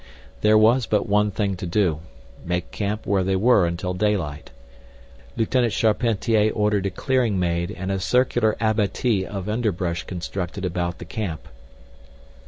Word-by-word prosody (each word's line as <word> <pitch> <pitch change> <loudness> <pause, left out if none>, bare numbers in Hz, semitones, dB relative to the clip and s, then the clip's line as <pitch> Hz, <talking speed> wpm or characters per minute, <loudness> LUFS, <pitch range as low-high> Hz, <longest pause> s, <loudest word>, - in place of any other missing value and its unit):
There 105 0 +5
was 115 +3 +4
but 105 -2 +1
one 105 +1 +3
thing 100 -1 -1
to 90 - -5
do, 85 -4 +1 0.4
make 90 0 -3
camp 105 +1 -3
where 100 -1 +1
they 95 +1 0
were 100 -2 +4
until 90 +2 -3
daylight. 90 -7 -1 0.9
Lieutenant 115 0 +1
Charpentier 110 -1 +2
ordered 105 -2 +1
a - - -1
clearing 120 +1 0
made 85 0 0
and 95 -2 -4
a 95 - -1
circular 120 +1 +2
abatis 110 -1 +1
of 100 -2 -5
underbrush 95 -6 -1
constructed 90 +1 -5
about 85 -1 -2
the - - -9
camp. 90 -4 -5
100 Hz, 145 wpm, -23 LUFS, 90-110 Hz, 0.9 s, There